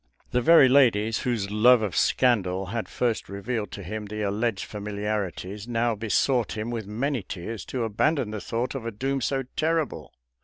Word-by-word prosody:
The 125 - +2
very 160 0 +7
ladies 115 -5 +4
whose 110 -5 -2
love 115 +2 +5
of 100 -4 -2
scandal 95 -7 +2
had 115 -2 -3
first 120 -3 -1
revealed 105 +1 -3
to 100 - -7
him 105 +3 -5
the 105 +1 -4
alleged 105 +1 -1
familiarities, 105 -1 -4
now 120 0 +1
besought 115 +3 +1
him 110 +2 -3
with 110 -4 -4
many 125 +5 -1
tears 100 +4 -6
to 125 -3 -3
abandon 115 +3 0
the 105 -2 -5
thought 120 +2 -2
of 135 -4 -5
a 115 - -3
doom 135 +5 -2
so 135 +2 0
terrible. 160 -1 -1
115 Hz, 175 wpm, -26 LUFS, 105-125 Hz, -, very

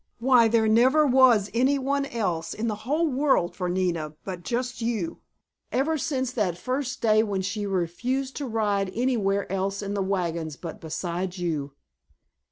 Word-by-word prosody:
Why, 245 -1 +5
there 225 0 +3
never 255 +8 +5
was 250 -6 +5
any 260 +4 +3
one 275 +1 -1
else 175 -9 -2
in 225 +2 -2
the 220 - 0 0.2
whole 320 +3 +2
world 265 - +1
for 180 -2 -2
Nina 170 -4 -1
but 185 -3 -6
just 245 +5 -3
you, 235 +8 -2 0.5
ever 295 +5 +1
since 265 -4 -1
that 205 -9 -1
first 255 +4 -3
day 215 -1 +5
when 200 -3 -1
she 205 +2 -3
refused 240 +9 -2
to 285 - -3
ride 205 -4 0
anywhere 210 -5 +1
else 195 +1 -2
in 200 0 -3
the 200 - -1
wagons 170 -5 -2
but 165 -2 -8
beside 175 +3 -3
you!" 155 -6 -2
215 Hz, 165 wpm, -26 LUFS, 185-255 Hz, 0.5 s, Why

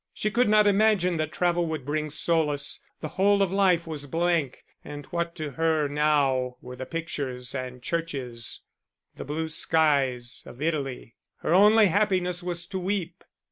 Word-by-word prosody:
She 215 - -1
could 240 0 +2
not 210 0 +5
imagine 200 -4 +3
that 155 -1 -2
travel 175 -1 +1
would 155 -5 -4
bring 155 +1 -2
solace 150 -2 0 0.2
the 155 - -3
whole 200 +3 +3
of 185 - -1
life 190 -4 +3
was 150 -3 -6
blank, 165 -3 0 0.2
and 145 -1 -8
what 170 -1 -2
to 155 -3 -5
her 160 +1 +1
now 140 -4 +1
were 125 0 -9
the 130 +1 -7
pictures 135 -7 -4
and 125 -2 -6
churches, 135 -9 -3 0.5
the - - -6
blue 160 +3 -3
skies 140 -7 +1
of 120 - -12
Italy? 140 -7 -3 0.2
Her 160 - 0
only 210 +3 +6
happiness 185 -2 +1
was 175 -1 -3
to 190 - -3
weep. 185 -2 -3
160 Hz, 160 wpm, -26 LUFS, 140-180 Hz, 0.5 s, only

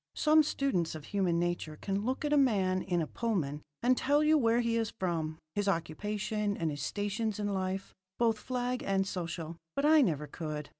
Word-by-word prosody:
Some 310 0 +5
students 265 - 0
of 155 - -7
human 190 -4 +1
nature 170 -3 -2
can 195 +1 -2
look 260 +6 -1
at 295 - +1
a 280 -2 +6
man 185 -1 +1
in 175 -3 0
a - - -2
Pullman 155 -10 -2 0.2
and 255 +1 +5
tell 290 +4 +2
you 310 +1 +5
where 235 -5 +3
he 235 -1 +1
is 225 -2 0
from, 160 -4 -1 0.2
his 205 -1 -1
occupation 205 +4 -1
and 165 -2 -1
his 145 -1 -5
stations 205 +6 -2
in 205 -1 -1
life, 190 0 -3 0.2
both 225 -2 +2
flag 250 +1 -2
and 195 0 +1
social; 170 -3 -4 0.2
but 280 - +1
I 310 0 +7
never 155 - +1
could. 150 0 -5
200 Hz, 195 wpm, -31 LUFS, 170-235 Hz, 0.2 s, I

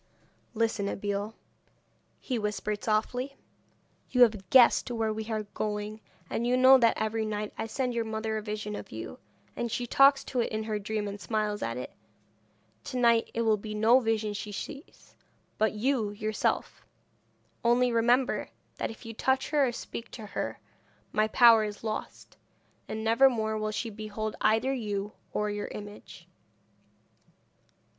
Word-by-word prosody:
'Listen, 220 -2 0
Abeille,' 205 +2 -3 0.8
he 250 -3 -2
whispered 210 0 -3
softly. 245 +5 -1 0.7
'You 250 -1 +6
have 210 -6 +1
guessed 255 0 +6
where 225 -2 -1
we 220 +1 -5
are 215 -1 -1
going, 210 0 -3 0.3
and 235 - -2
you 250 +1 +3
know 260 +1 +8
that 230 -2 +3
every 220 +1 -1
night 210 -1 -3
I 225 - -4
send 250 +2 -2
your 235 -1 0
mother 220 0 -3
a 215 - -2
vision 210 0 -4
of - - -8
you, 110 -7 -7 0.4
and 235 -1 -3
she 245 - -2
talks 275 +3 +5
to 255 - -3
it 235 - 0
in 215 0 -2
her 215 -1 -2
dream, 210 0 -3
and 200 0 -6
smiles 210 -2 -1
at 115 +1 -2
it. 125 - -6 0.9
To 255 - -4
night 235 -2 +4
it 230 - +1
will 220 -1 +3
be 215 +1 -6
no 225 +4 +5
vision 220 -3 0
she 205 0 -5
sees, 280 - -9 0.5
but 220 +1 +2
you 225 0 0
yourself; 215 +1 -2 0.8
only 240 +1 +3
remember, 240 +3 +2 0.3
that - - -2
if 225 +1 -11
you 225 - -6
touch 265 +5 0
her 290 -3 +4
or - - -1
speak 230 -1 -7
to 220 - -7
her 200 - -4 0.5
my 215 0 +2
power 230 -1 +7
is 210 0 -6
lost, 215 -1 -5 0.5
and 220 0 -4
never 230 +5 +5
more 220 -3 -1
will 215 0 -1
she 215 +2 -3
behold 215 0 -5
either 225 +5 +3
you 210 -4 -3 0.2
or 210 0 -1
your 205 0 -3
image.' 205 0 -10
220 Hz, 165 wpm, -29 LUFS, 210-235 Hz, 0.9 s, know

